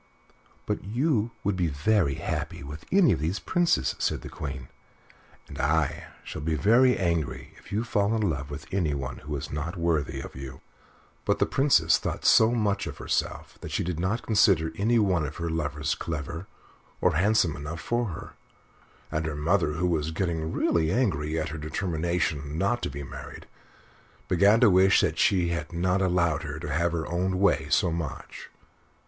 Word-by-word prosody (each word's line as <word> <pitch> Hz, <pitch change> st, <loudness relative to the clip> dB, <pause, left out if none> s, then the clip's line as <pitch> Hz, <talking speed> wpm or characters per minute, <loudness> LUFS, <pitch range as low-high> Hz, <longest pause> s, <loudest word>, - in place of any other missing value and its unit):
"But -, -, -2 dB
you 120 Hz, -, 0 dB
would 100 Hz, -1 st, 0 dB
be 90 Hz, -2 st, +1 dB
very 75 Hz, +1 st, +1 dB
happy -, -, -4 dB
with 75 Hz, +3 st, -9 dB
any 190 Hz, -8 st, +5 dB
of 85 Hz, -, +1 dB
these 80 Hz, +6 st, -1 dB
Princes," 175 Hz, -, +1 dB
said -, -, 0 dB
the -, -, -7 dB
Queen, 65 Hz, -4 st, -6 dB, 0.8 s
"and -, -, -9 dB
I 75 Hz, +1 st, +1 dB, 0.2 s
shall -, -, -7 dB
be 80 Hz, +1 st, 0 dB
very 125 Hz, +8 st, +4 dB
angry 85 Hz, -5 st, -2 dB
if -, -, -17 dB
you 105 Hz, +3 st, 0 dB
fall 105 Hz, -1 st, +1 dB
in 110 Hz, -, 0 dB
love 70 Hz, -4 st, -3 dB
with 75 Hz, +3 st, -7 dB
anyone 70 Hz, -9 st, -1 dB
who 75 Hz, 0 st, -6 dB
is 70 Hz, -, -5 dB
not 80 Hz, +5 st, -4 dB
worthy 85 Hz, -3 st, 0 dB
of -, -, -8 dB
you." 65 Hz, 0 st, -8 dB, 0.6 s
But -, -, +1 dB
the -, -, +2 dB
Princess 135 Hz, 0 st, +3 dB
thought -, -, -4 dB
so 110 Hz, -, +6 dB
much 105 Hz, -4 st, 0 dB
of -, -, -7 dB
herself -, -, -3 dB
that -, -, -6 dB
she -, -, -1 dB
did 85 Hz, -2 st, -3 dB
not 95 Hz, +7 st, -1 dB
consider 95 Hz, -7 st, +3 dB
any 115 Hz, +6 st, +2 dB
one 95 Hz, -7 st, +2 dB
of 75 Hz, +1 st, -5 dB
her 85 Hz, -1 st, -3 dB
lovers 75 Hz, -2 st, -1 dB
clever 85 Hz, +3 st, -5 dB, 0.5 s
or -, -, +2 dB
handsome 95 Hz, -5 st, +2 dB
enough 75 Hz, +3 st, -6 dB
for 120 Hz, 0 st, -1 dB
her; 85 Hz, -, -8 dB, 0.8 s
and 80 Hz, +1 st, -1 dB
her 75 Hz, -, -3 dB
mother, 75 Hz, +1 st, +1 dB
who 85 Hz, +4 st, -1 dB
was 80 Hz, -3 st, 0 dB
getting 80 Hz, -2 st, -2 dB
really 80 Hz, -1 st, +1 dB
angry 80 Hz, -, 0 dB
at 80 Hz, -, -2 dB
her 80 Hz, +1 st, -6 dB
determination 80 Hz, -2 st, -2 dB
not 120 Hz, +7 st, +1 dB
to -, -, -2 dB
be 70 Hz, +1 st, -6 dB
married, 65 Hz, -, -9 dB, 0.8 s
began 100 Hz, +5 st, +4 dB
to 120 Hz, -, +7 dB
wish 95 Hz, +1 st, +5 dB
that -, -, 0 dB
she 90 Hz, -3 st, +3 dB
had 85 Hz, +1 st, -3 dB
not 90 Hz, +3 st, +1 dB
allowed 85 Hz, -5 st, +2 dB
her 75 Hz, -2 st, -5 dB
to 75 Hz, -2 st, -4 dB
have 85 Hz, +3 st, +1 dB
her 85 Hz, -1 st, -2 dB
own 90 Hz, +2 st, -1 dB
way 100 Hz, +1 st, +2 dB
so 85 Hz, -, +3 dB
much. 80 Hz, -3 st, -6 dB
85 Hz, 180 wpm, -27 LUFS, 75-100 Hz, 0.8 s, to